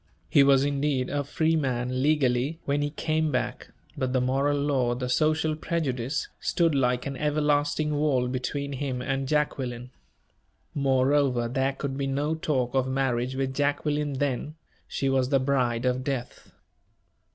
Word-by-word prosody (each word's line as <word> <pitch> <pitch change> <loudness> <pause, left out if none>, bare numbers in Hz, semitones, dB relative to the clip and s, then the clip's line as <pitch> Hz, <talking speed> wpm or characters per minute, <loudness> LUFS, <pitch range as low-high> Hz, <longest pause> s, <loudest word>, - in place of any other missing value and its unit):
He 140 - +6
was, 135 -1 +5
indeed, 140 -2 0
a 145 0 0
free 160 +3 +1
man, 130 -3 -1
legally, 140 0 +2
when 145 +1 0
he 145 - 0
came 155 +1 -1
back; 125 -1 -2 0.3
but 130 -4 -2
the 130 - +3
moral 135 +3 +1
law, 135 -4 +1
the 125 +1 -3
social 155 +3 +2
prejudice, 145 -5 -2
stood 170 -3 +1
like 125 -2 +1
an 140 -1 -4
everlasting 150 0 +1
wall 145 -4 +1
between 140 +3 -3
him 130 -2 -3
and 135 0 -2
Jacqueline. 130 -4 -1 0.8
Moreover, 135 -2 +2
there 135 +2 0
could 135 0 -4
be 140 - -1
no 145 +3 0
talk 135 -6 -1
of 130 -1 +1
marriage 130 -1 0
with 135 0 -1
Jacqueline 145 +1 0
then 140 +2 -2 0.3
she 135 - -2
was 130 -1 +2
the 140 -1 +3
bride 130 -3 0
of 125 0 0
death! 130 -3 -5
135 Hz, 150 wpm, -27 LUFS, 130-145 Hz, 0.8 s, He